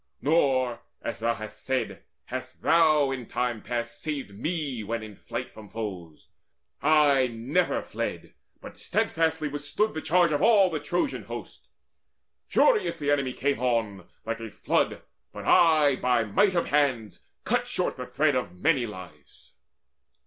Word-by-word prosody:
Nor, 130 -6 +2 0.2
as 115 - -4
thou 115 +1 0
hast 110 0 -9
said, 130 -1 -2 0.2
Hast - - -7
thou 155 -4 +4
in 125 -4 -5
time 120 -3 -2
past 120 -1 -4
saved 145 -10 -4
me 145 - -3
when 115 +2 -3
in 105 -2 -10
flight - - -6
From 105 -2 -12
foes. 95 -8 -7 0.5
I 145 -3 +4
never 115 +1 0
fled, - - -5 0.3
but - - -11
steadfastly 160 -2 0
Withstood 145 +9 -1
the 155 - -4
charge 175 0 +3
of 145 - 0
all 200 -5 +5
the 155 - -2
Trojan 175 - -2
host. - - -9 0.8
Furious 435 - +3
the 145 -2 0
enemy 135 -3 +1
came 140 0 -1
on 115 -7 -1 0.2
like 115 +1 -3
a 115 -1 -6
flood - - -1 0.3
But - - -8
I 155 -5 +5
by 125 -2 +2
might 180 - +2
of 170 - 0
hands 130 -8 0 0.2
cut - - 0
short - - -1
the - - -7
thread 150 -2 +1
Of 105 -9 -2
many 135 - +2
lives. 90 -8 -12
130 Hz, 150 wpm, -27 LUFS, 115-155 Hz, 0.8 s, all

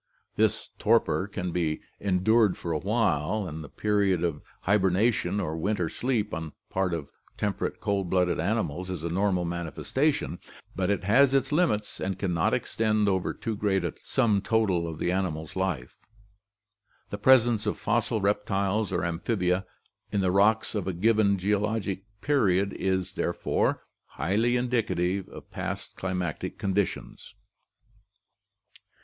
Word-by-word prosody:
This 110 0 +1
torpor 110 -3 +2
can 90 -3 -4
be 80 -3 -1 0.2
endured 100 +2 +3
for 85 - -4
a 75 - 0
while 100 -2 0
and 80 -1 -6
the 70 - -10
period 100 -3 +1
of 80 -4 -1 0.2
hibernation 100 0 +2
or 80 -5 -2
winter 90 0 -1
sleep 115 -2 -1
on 80 +1 -3
the 80 - -9 0.2
part 95 -2 +1
of 75 -4 -7 0.3
temperate 100 -2 -2
cold 100 -3 -1
blooded 90 -1 +2
animals 90 -2 -1
is 90 -4 -4
a 85 - -1
normal 90 0 +1
manifestation, 85 - -1 0.4
but 90 +1 0
it 100 -2 0
has 135 +7 +5
its 135 - +1
limits 145 -10 +1
and 95 -1 -2
can 95 -3 -1
not 80 -1 +2
extend 110 -2 +1
over 95 -2 +1
too 115 - -4
great 100 -3 +1
a 85 - -2
sum 105 -4 +2
total 100 -6 +1
of 80 -2 -5
the 90 - 0
animal's 80 -5 -2
life. 95 -10 -2 1.1
The 100 - -4
presence 120 -2 +4
of - - 0
fossil 115 0 0
reptiles 100 0 0
or 90 -1 0
amphibia 90 +2 0 0.4
in 100 - +1
the 95 -1 +2
rocks 105 +3 +3
of 100 -4 -2
a 95 - -1
given 105 +2 +3
geo 100 +2 +1
logic 100 -2 -2 0.2
period 100 -9 +2
is, 95 -1 -1
therefore, 85 - 0 0.2
highly 110 +8 0
indicative 100 -7 0
of - - -12
past - - -5
climatic 90 -4 -3
condi 100 0 +1
tions. - - -10
95 Hz, 150 wpm, -27 LUFS, 90-105 Hz, 1.1 s, has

